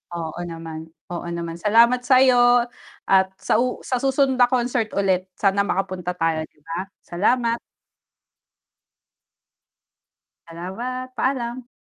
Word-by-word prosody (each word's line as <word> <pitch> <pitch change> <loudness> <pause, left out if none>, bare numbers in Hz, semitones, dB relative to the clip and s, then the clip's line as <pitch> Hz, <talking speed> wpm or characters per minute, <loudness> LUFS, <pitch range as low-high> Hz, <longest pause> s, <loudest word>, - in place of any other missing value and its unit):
Oo 165 0 -5
naman, 165 -1 -7 0.2
oo 175 0 -5
naman. 170 0 -5
Salamat 230 +4 +5
sayo 245 -2 +5 0.5
at 190 0 +5
sa 215 - +1
u 250 0 -1
sa 255 -2 -1
susunod 270 -1 +1
na 245 - +7
concert 245 -2 0
ulit 190 -2 +1
sana 200 0 +1
makapunta 180 -2 -2
tayo 160 -2 -1
'di 150 - -33
ba? 165 +2 -5 0.2
Salamat. 230 +6 +1 2.9
Salamat, 235 +10 -6
paalam. 250 -2 -2
210 Hz, 110 wpm, -22 LUFS, 175-245 Hz, 2.9 s, na